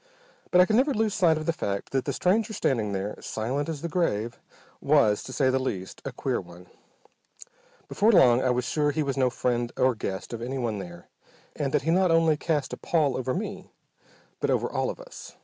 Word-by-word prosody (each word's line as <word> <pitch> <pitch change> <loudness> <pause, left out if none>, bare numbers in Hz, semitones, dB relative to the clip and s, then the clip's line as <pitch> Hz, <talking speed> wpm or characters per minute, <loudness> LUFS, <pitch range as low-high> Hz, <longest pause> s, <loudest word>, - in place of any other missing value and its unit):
But 180 - +4
I - - +6
could 215 +3 +2
never 270 +2 +2
lose 215 -1 +1
sight 170 -6 +3
of 155 - -5
the 165 - +1
fact 100 - -4
that 135 -1 0
the 140 - -1
stranger 210 - +1
standing 110 - 0
there, 100 +2 -3
silent 130 +8 -3
as 155 -2 -5
the - - -1
grave, 120 - -1 0.4
was, 105 -1 +3
to - - -9
say 130 0 +2
the 130 - +1
least, 95 -8 -4
a - - -4
queer - - -2
one. 90 0 -14 1.2
Before 215 +3 +3
long 125 - +6
I 130 - +1
was 125 0 0
sure 150 +3 +1
he 150 +2 0
was 140 -2 -2
no 130 -2 +2
friend 120 -1 -1
or 130 0 +3
guest 100 -1 -5
of 115 - -5
anyone 120 -4 -3
there, 85 -2 -9 0.5
and 140 -3 -2
that - - +1
he 165 - +1
not 185 +1 +3
only 165 -1 +4
cast 150 -2 -2
a - - -4
pall 155 -6 +1
over 130 0 -2
me 195 0 -5 0.7
but - - -1
over - - +1
all - - -1
of - - -6
us. - - -11
135 Hz, 215 wpm, -26 LUFS, 120-170 Hz, 1.2 s, I